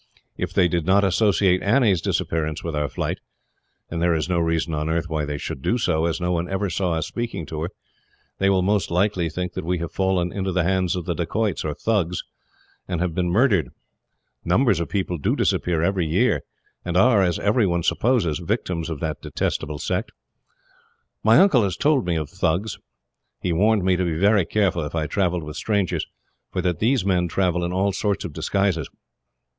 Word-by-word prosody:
If - - -3
they 90 -3 +3
do 85 0 0
not 95 +5 +3
associate 95 -1 +3
Annie's 105 -5 +3
disappearance 80 -1 -1
with 85 -2 -3
our 75 -1 -1
flight - - -3 0.7
and 85 0 -3
there 85 -1 +3
is 80 -1 -1
no 90 -1 +1
reason 80 0 0
on 75 +1 -2
earth 85 +1 0
why 80 -2 -2
they 75 0 -3
should 70 - -6
do 115 - +1
so, 80 -9 +1
as 80 -1 -2
no 90 0 -1
one 85 0 -1
ever 95 0 -1
saw 90 0 0
us 80 -1 -1
speaking 115 -7 -4
to 75 +1 -5
her 85 - -2 0.7
they 95 - +3
will 95 -2 +3
most 100 +1 +1
likely 90 -1 +1
think 90 +3 -4
that - - -4
we 90 +2 0
have 85 -1 -5
fallen 95 -2 0
into 95 0 -2
the 90 -1 +1
hands 95 +1 +1
of 90 -3 -4
the 90 - -1
Dacoits, 100 +3 -1
or 75 -2 -3
Thugs, 95 -6 0 0.6
and 90 -3 -2
have 90 -1 -1
been 90 0 0
murdered. 95 - +3 0.7
Numbers 95 +1 +3
of 85 - -3
people 90 -4 -2
do - - +1
disappear 85 -2 +1
every 90 -2 +1
year, 80 - +2 0.4
and 90 0 -1
are, 110 0 +5
as 90 -3 +1
everyone 100 -6 +1
supposes, 105 - +1
victims 90 -3 -2
of 80 -4 -5
that 80 -2 -3
detestable 75 -1 -2
sect. - - -2 1.1
My 110 +1 +6
uncle 185 -10 +6
has 100 -3 -1
told 145 -8 +2
me 85 - +1
of 80 -2 -2
Thugs. 95 +10 -1 0.6
He 90 - -1
warned 105 +3 +3
me 95 -1 +3
to 90 - 0
be 85 -3 -1
very 100 0 +4
careful, 95 -5 +1
if 75 +2 -5
I 80 -1 0
travelled 90 -1 0
with 75 +1 -7
strangers, 100 -2 -1 0.4
for - - -3
that 90 -3 0
these 120 -1 +2
men 90 -2 +2
travel 90 0 0
in 85 - -2
all 95 +2 +1
sorts 100 0 -1
of 85 - -6
disguises. 95 -3 0
90 Hz, 200 wpm, -23 LUFS, 80-100 Hz, 1.1 s, My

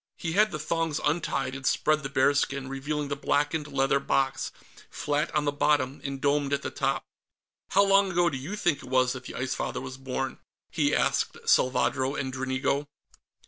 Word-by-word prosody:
He 165 - -3
had 210 +5 +4
the 155 - -4
thongs 165 0 -1
untied, 150 -4 0
and 135 0 -7
spread 155 +3 +2
the 135 - -4
bearskin, 140 0 +1
revealing 145 +2 -3
the 145 - -1
blackened 145 +1 0
leather 135 -1 +2
box, 135 -1 0 0.4
flat 145 +1 -1
on 150 -1 +2
the 145 - +2
bottom 145 -2 +1
and 140 -1 -4
domed 140 0 +1
at 140 - 0
the - - -3
top. 135 0 -1 0.7
"How 200 - +5
long 195 0 +4
ago 175 -1 +3
do 145 - -1
you 150 +11 -5
think 175 -8 +1
it - - -11
was 130 -1 +3
that 130 -1 -8
the - - -7
Ice 130 +1 -2
Father - - -3
was 130 - -7
born?" 135 0 -4 0.3
he - - +2
asked - - +1
Salvadro 130 +1 +2
and 135 -3 -3
Dranigo. 130 +2 -1
140 Hz, 185 wpm, -27 LUFS, 135-150 Hz, 0.7 s, How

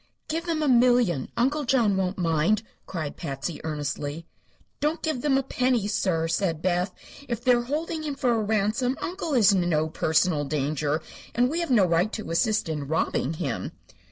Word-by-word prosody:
"Give 330 +3 -3
them 320 -2 0
a - - +1
million 245 - +3
Uncle 285 +5 +1
John 235 -6 +2
won't 190 0 -1
mind," 170 +5 +2 0.2
cried 155 -5 -4
Patsy, 145 +1 -4
earnestly. 150 0 -4 0.5
"Don't 300 +3 -1
give 310 -6 -1
them 275 -1 +2
a 270 - +1
penny, 250 -5 +1
sir," 185 -6 0
said 165 -1 0
Beth. 180 +1 +1 0.4
"If 235 -1 -3
they 250 -1 +5
are 240 - +2
holding 310 +6 -3
him 295 -2 -3
for 255 -3 +1
a 230 -2 +1
ransom 220 +5 0
Uncle 340 -4 -3
is 215 -5 +6
in 180 -2 +1
no 155 -1 +1
personal 160 0 +1
danger, 150 +1 -1 0.3
and 245 +2 +3
we 330 - -1
have 340 - -2
no 225 -7 +5
right 175 +4 +2
to 215 -6 -5
assist 210 +5 +1
in 150 -3 -3
robbing 160 -1 0
him." 150 -7 -3
205 Hz, 185 wpm, -26 LUFS, 160-255 Hz, 0.5 s, is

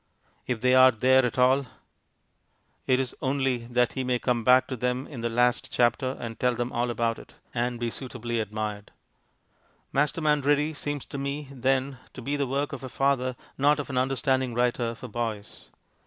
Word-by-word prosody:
If 120 -3 -2
they 125 0 +3
are 130 0 +8
there 130 +2 +4
at 125 +1 -1
all, 130 +2 +3 1.2
it 130 0 +3
is 130 -2 -2
only 130 -3 0
that 120 0 +1
he 130 - -2
may 125 -1 +1
come 120 -1 0
back 125 +2 +6
to 130 - -2
them 125 +2 -1
in 130 -6 -8
the 120 - -1
last 120 +1 +1
chapter 125 +2 +1
and 115 -2 -6
tell 125 -1 +2
them 120 +1 -2
all 120 +1 -1
about 115 -1 -1
it... - - -15 0.2
and 120 0 -1
be 120 -1 -2
suitably 120 -3 -4
admired. 105 -1 -4 1.0
Masterman 150 +1 +2
Ready 145 +2 +2
seems 145 -1 -4
to 140 - -6
me, 140 +1 -4
then, 135 0 0
to 130 - -8
be 140 +4 -1
the 140 -1 -1
work 140 +3 -1
of 135 - -6
a 130 - -5
father, 130 -1 0 0.2
not 145 +2 +4
of 140 - -4
an 130 - -2
understanding 130 -1 0
writer 120 -1 0
for 125 - -9
boys. 110 -3 -5
125 Hz, 185 wpm, -27 LUFS, 120-135 Hz, 1.2 s, are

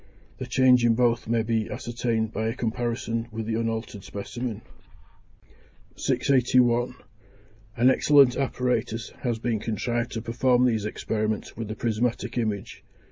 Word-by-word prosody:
The 130 - -5
change 125 -1 +4
in 115 -1 +4
both 120 -1 +1
may 115 0 +1
be 110 -1 -1
ascertained 115 -2 -2
by 110 +2 -1
a 115 - -2
comparison 115 0 -2
with 110 0 -4
the 115 - -2
unaltered 115 -3 -3
specimen. 115 +2 -5 1.3
681. 125 -2 +2 0.8
An 120 +2 +5
excellent 140 -2 +5
apparatus 125 -4 -1
has 120 -3 -1
been 115 -1 -1
contrived 120 +2 -2
to 115 - -3
perform 125 +2 +2
these 110 -4 +1
experiments 110 0 -2
with 115 -1 -5
the 110 - -5
prismatic 120 +1 -1
image. 105 -4 -3
115 Hz, 135 wpm, -26 LUFS, 110-125 Hz, 1.3 s, An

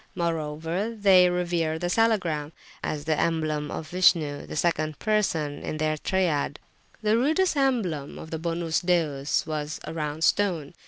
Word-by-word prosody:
Moreover, 165 +5 -2
they 190 -4 +6
revere 175 -3 0
the 175 - -4
Salagram, 175 -7 +1 0.3
as 150 -1 -3
the 155 -1 +1
emblem 155 -3 0
of 155 - -5
Vishnu, 165 -5 +2
the - - -7
second 155 -2 0
person 165 -9 0
in 155 - -4
their 155 0 0
triad. 155 -4 0 0.5
The 215 +1 +3
rudest 320 +7 +2
emblem 220 - 0
of 160 - -9
the 160 - -3
Bonus 165 0 -1
Deus 155 -6 +1
was 155 -1 -4
a 155 - -6
round 155 0 -3
stone. 175 -7 +1
165 Hz, 150 wpm, -26 LUFS, 155-185 Hz, 0.5 s, they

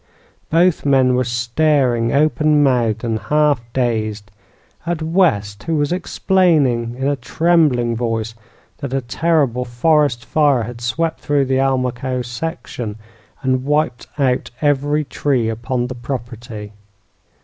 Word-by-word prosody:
Both 170 +1 +3
men 130 -2 +3
were 125 +1 +2
staring, 120 0 +1
open 150 +1 +3
mouthed 120 -5 +1
and 115 -2 -1
half 150 -1 +2
dazed, 110 -5 -2 0.5
at 170 -2 -2
West, 140 - +1
who 165 - 0
was 145 0 0
explaining 155 -10 +1
in 135 +1 -1
a 145 - +1
trembling 135 -4 +2
voice 115 -1 -2 0.5
that 140 -3 -4
a 135 - 0
terrible 130 -1 0
forest 125 0 +1
fire 145 -6 +2
had 120 +1 -8
swept 160 +8 -1
through 145 -2 +1
the 130 0 +1
Almaquo 130 -1 -1
section 120 -4 -5 0.5
and 130 -1 +1
wiped 150 -3 0
out 130 -3 +1
every 145 +1 +1
tree 135 -5 0
upon 120 +2 -2
the 125 - -5
property. 120 -4 -7
130 Hz, 125 wpm, -19 LUFS, 120-150 Hz, 0.5 s, Both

